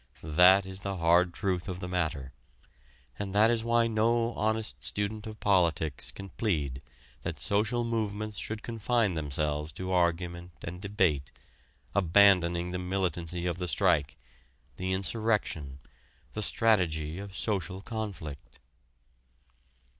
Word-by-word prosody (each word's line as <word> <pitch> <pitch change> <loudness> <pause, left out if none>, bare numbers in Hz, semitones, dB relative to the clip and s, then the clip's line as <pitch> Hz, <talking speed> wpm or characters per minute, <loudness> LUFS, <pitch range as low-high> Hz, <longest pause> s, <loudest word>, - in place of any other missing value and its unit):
That 90 +5 +6
is 95 0 -3
the 100 0 -4
hard 85 +1 +4
truth 90 +1 -2
of 90 -1 -4
the 90 - -5
matter. 80 -7 -2 0.9
And 100 -1 -4
that 110 +3 +6
is 115 -1 +1
why 115 0 +3
no 115 +1 +1
honest 110 0 -1
student 105 +1 -3
of 110 0 -8
politics 85 -7 +1
can 100 0 -9
plead 75 - -1 0.4
that - - -4
social 110 +4 +1
movements 110 -2 -2
should 110 +1 -5
confine 115 -2 0
themselves 75 0 -2
to 95 0 -5
argument 85 0 0
and 90 +2 -6
debate, 95 -9 0 0.6
abandoning 90 -2 +4
the 90 - -3
militancy 90 -2 -2
of 90 0 -2
the 90 - -2
strike, 80 -3 +2 0.6
the 95 +1 -2
insurrection, 95 - -1 0.6
the 105 - -3
strategy 90 -8 +1
of 100 -1 -8
social 95 -2 -2
conflict. 100 -11 -6
95 Hz, 125 wpm, -29 LUFS, 85-105 Hz, 0.9 s, That